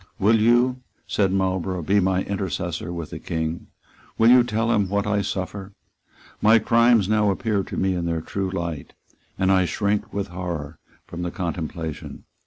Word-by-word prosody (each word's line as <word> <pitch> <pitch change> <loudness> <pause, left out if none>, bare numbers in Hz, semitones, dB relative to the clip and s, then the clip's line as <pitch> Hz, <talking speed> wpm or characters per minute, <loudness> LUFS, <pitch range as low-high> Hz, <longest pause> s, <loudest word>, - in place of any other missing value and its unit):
"Will 110 +3 +3
you," 120 +3 +3 0.2
said 95 -2 +1
Marlborough, 95 -2 -1
"be 100 +6 +3
my 95 0 +1
intercessor 90 -3 -3
with 85 -3 -6
the - - -6
King? 80 0 -3 0.5
Will 115 +1 +6
you 125 -1 +7
tell 115 -1 0
him 105 -5 +1
what 100 0 0
I 105 -1 +1
suffer? 95 +1 -4 0.7
My 110 +2 +6
crimes 115 -1 +4
now 105 -1 +2
appear 105 0 0
to - - -7
me 95 0 +1
in 90 -1 -2
their 85 -1 -1
true 95 +3 -3
light; 85 -5 -5 0.4
and 95 0 +2
I 95 -1 +4
shrink 100 +4 -1
with 100 0 -3
horror 85 -4 -5 0.3
from 85 - -7
the 90 - -2
contemplation. 85 -3 -5
95 Hz, 170 wpm, -23 LUFS, 85-105 Hz, 0.7 s, you